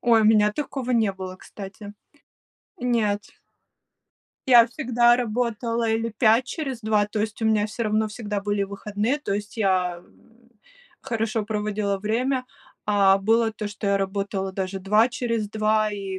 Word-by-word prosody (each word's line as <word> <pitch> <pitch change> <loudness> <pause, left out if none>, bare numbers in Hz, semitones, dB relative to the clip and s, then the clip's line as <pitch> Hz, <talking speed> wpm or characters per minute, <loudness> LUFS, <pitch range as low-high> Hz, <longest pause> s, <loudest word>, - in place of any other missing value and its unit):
Ой, 230 -2 +4
у - - +2
меня 210 -1 +5
такого 270 -1 -4
не 225 -5 +2
было, 185 -1 -7
кстати. 200 +1 -10 0.9
Нет. 220 -5 0 1.3
Я 240 -2 +8
всегда 240 -3 +3
работала 235 -1 -1
или 225 +1 0
5 225 +2 +3
через 270 -5 -4
2, 215 -2 +2
то 215 - -4
есть 215 +1 -3
у - - +1
меня 215 -1 +2
всё 220 +2 -5
равно 215 0 +1
всегда 210 -1 -4
были 205 0 -1
выходные, 205 +6 -2
то 295 - -4
есть 205 +2 -5
я, 185 -4 +1
м, 235 +7 -22 0.5
хорошо 225 -1 -2
проводила 210 -1 -2
время, 250 +6 -1 0.4
а 200 -2 +4
было 225 +3 +2
то, 215 -1 -5
что 205 0 -6
я 200 - +3
работала 195 0 -2
даже 190 0 -3
2 210 +5 +3
через 230 -4 -2
2, 215 0 +1
и 195 -2 -5
215 Hz, 155 wpm, -24 LUFS, 205-230 Hz, 1.3 s, Я